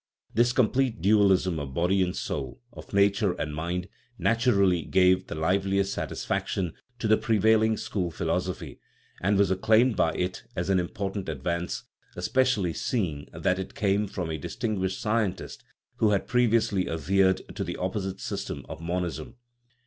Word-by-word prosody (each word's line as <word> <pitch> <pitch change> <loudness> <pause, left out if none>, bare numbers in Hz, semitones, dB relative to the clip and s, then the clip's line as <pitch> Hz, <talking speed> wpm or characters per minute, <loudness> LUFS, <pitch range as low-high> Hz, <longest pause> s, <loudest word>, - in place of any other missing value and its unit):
This 120 +2 +3
complete 125 -1 +1
dualism 95 -3 +3
of 70 -2 -6
body 90 +3 +2
and 90 -1 0
soul, 65 -4 -4
of - - -11
nature 100 -1 +3
and 75 -3 -4
mind, 85 +4 -3 0.3
naturally 100 -8 +3
gave 90 +4 +3
the - - -5
liveliest 95 +4 +1
satis - - -4
faction 90 -4 -1 0.2
to 110 - -2
the 110 0 +5
prevailing 110 0 +3
school 90 -4 -2
philosophy, 80 - -3 0.4
and 100 +2 +2
was 100 -2 +3
acclaimed 110 +5 +3
by 80 - +2
it 90 +1 -2
as 90 +3 -1
an 95 - +4
important 95 +1 -3
advance, 85 +4 -3 0.3
especially 125 -10 +1
seeing 80 - -2
that 90 +1 0
it 95 - -6
came 100 0 +1
from 90 -4 -4
a 80 - -3
distinguished 95 +2 -2
scientist 105 -5 -2 0.3
who 110 - +3
had 100 -2 +1
previously 115 -5 +2
adhered 95 +3 +1
to - - -2
the - - -4
opposite 95 +1 -3
system - - -5
of - - -8
mon 90 +2 -1
ism. 85 +7 -6
95 Hz, 155 wpm, -27 LUFS, 90-110 Hz, 0.4 s, the